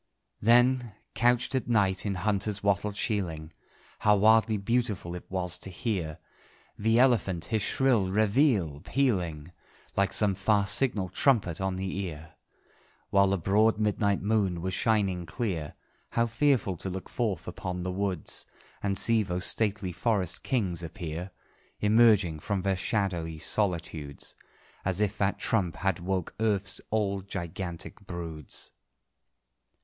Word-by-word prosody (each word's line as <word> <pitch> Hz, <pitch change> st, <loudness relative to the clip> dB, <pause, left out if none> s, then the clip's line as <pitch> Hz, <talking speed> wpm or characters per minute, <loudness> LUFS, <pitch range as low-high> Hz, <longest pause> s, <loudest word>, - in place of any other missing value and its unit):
Then, 120 Hz, 0 st, +4 dB, 0.2 s
couched 120 Hz, +3 st, +2 dB
at 130 Hz, -1 st, -1 dB
night 100 Hz, -4 st, +2 dB
in 100 Hz, -, -1 dB
hunter's 100 Hz, +1 st, -1 dB
wattled 100 Hz, +1 st, +1 dB
sheiling, 85 Hz, -9 st, -2 dB, 0.5 s
How 105 Hz, 0 st, +4 dB
wildly 110 Hz, +1 st, +4 dB
beautiful 105 Hz, -4 st, -1 dB
it 90 Hz, -, -9 dB
was 90 Hz, -2 st, -1 dB
to -, -, -6 dB
hear 90 Hz, -5 st, -3 dB, 0.6 s
The 110 Hz, +2 st, +2 dB
elephant 110 Hz, -9 st, +3 dB
his 110 Hz, -, +2 dB
shrill 120 Hz, -3 st, +2 dB
réveillé 100 Hz, -, +2 dB
pealing, 90 Hz, -, -1 dB, 0.4 s
Like 100 Hz, 0 st, +2 dB
some 105 Hz, -2 st, +3 dB
far 100 Hz, +2 st, +2 dB
signal 100 Hz, -4 st, +1 dB
trumpet 100 Hz, -, +1 dB
on 95 Hz, -1 st, -1 dB
the 95 Hz, 0 st, -3 dB
ear! 80 Hz, -4 st, -6 dB, 0.8 s
While 100 Hz, -1 st, +5 dB
the 100 Hz, -, +1 dB
broad 105 Hz, +5 st, +3 dB
midnight 105 Hz, -2 st, +1 dB
moon 100 Hz, -4 st, +1 dB
was 95 Hz, 0 st, -2 dB
shining 95 Hz, -5 st, +1 dB
clear, 80 Hz, -4 st, -3 dB, 0.3 s
How 115 Hz, -, +1 dB
fearful 120 Hz, -, +1 dB
to 95 Hz, -, -4 dB
look 95 Hz, 0 st, -6 dB
forth 105 Hz, -9 st, -2 dB
upon 90 Hz, 0 st, -4 dB
the 90 Hz, -, -2 dB
woods, 95 Hz, -4 st, -3 dB, 0.3 s
And 100 Hz, -1 st, -1 dB
see 115 Hz, +2 st, +5 dB
those 90 Hz, -2 st, -2 dB
stately 100 Hz, -1 st, +1 dB
forest 95 Hz, -1 st, -1 dB
kings 95 Hz, -10 st, -1 dB
appear, 85 Hz, +1 st, -6 dB, 0.5 s
Emerging 105 Hz, -6 st, +4 dB
from 95 Hz, +4 st, -2 dB
their 95 Hz, -1 st, +1 dB
shadowy 90 Hz, -5 st, -2 dB
solitudes 80 Hz, -5 st, -2 dB, 0.5 s
As 95 Hz, 0 st, 0 dB
if 105 Hz, 0 st, +1 dB
that 100 Hz, 0 st, +1 dB
trump 90 Hz, -8 st, 0 dB
had 95 Hz, -2 st, -1 dB
woke 90 Hz, 0 st, -2 dB
Earth's 100 Hz, -3 st, 0 dB
old 100 Hz, -3 st, -1 dB
gigantic 85 Hz, -1 st, -5 dB
broods! 80 Hz, -5 st, -5 dB
100 Hz, 135 wpm, -28 LUFS, 90-110 Hz, 0.8 s, While